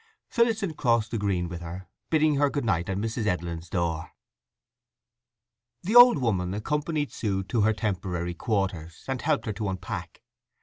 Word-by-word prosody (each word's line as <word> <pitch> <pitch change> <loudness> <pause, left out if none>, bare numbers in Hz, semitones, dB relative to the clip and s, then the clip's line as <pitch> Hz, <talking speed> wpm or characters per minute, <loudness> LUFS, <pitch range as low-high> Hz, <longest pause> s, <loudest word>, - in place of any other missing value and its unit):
Phillotson 225 -7 +1
crossed 115 -6 +1
the 115 - -1
green 95 -4 0
with 85 0 -7
her, 90 +2 -7 0.2
bidding 155 -2 +3
her 145 0 +3
good 140 -2 -2
night 90 -5 0
at 95 - -1
Mrs. 110 +1 -2
Edlin's 85 -3 -2
door. 85 -3 -2 1.7
The 205 +6 -1
old 245 -4 +10
woman 100 -8 0
accompanied 150 +6 -1
Sue 95 -3 -2
to 110 +4 0
her 110 +1 +4
temporary 90 -5 -2
quarters, 95 -5 -2
and 135 -1 -2
helped 155 -4 +1
her 110 - -2
to 105 -1 -3
unpack. 95 -2 -6
105 Hz, 160 wpm, -27 LUFS, 90-140 Hz, 1.7 s, old